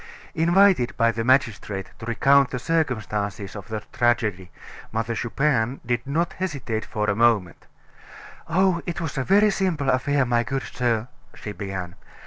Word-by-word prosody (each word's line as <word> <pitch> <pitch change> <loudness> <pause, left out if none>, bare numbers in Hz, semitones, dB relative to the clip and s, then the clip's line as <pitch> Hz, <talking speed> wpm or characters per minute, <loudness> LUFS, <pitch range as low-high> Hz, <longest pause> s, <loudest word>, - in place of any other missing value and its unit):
Invited 170 -5 +3
by 115 -1 +3
the 115 0 -3
magistrate 115 -6 0
to 110 - -8
recount 135 +3 +4
the 125 - -3
circumstances 110 - -2
of 100 -2 -8
the 110 -1 -4
tragedy, 105 -7 0 0.4
Mother 115 +1 -2
Chupin 125 0 0
did 120 +1 -2
not 165 +5 0
hesitate 140 -11 -3
for 105 0 -2
a 100 - +1
moment. 110 -6 +1 0.8
"Oh, 180 0 +2
it 175 - -3
was 160 -4 -4
a - - 0
very 205 +6 +4
simple 170 -9 0
affair, 135 +2 +1
my 120 -1 +2
good 135 +3 -3
sir," 120 -2 -1 0.3
she 105 - -7
began. 95 -3 -5
120 Hz, 150 wpm, -24 LUFS, 110-145 Hz, 0.8 s, recount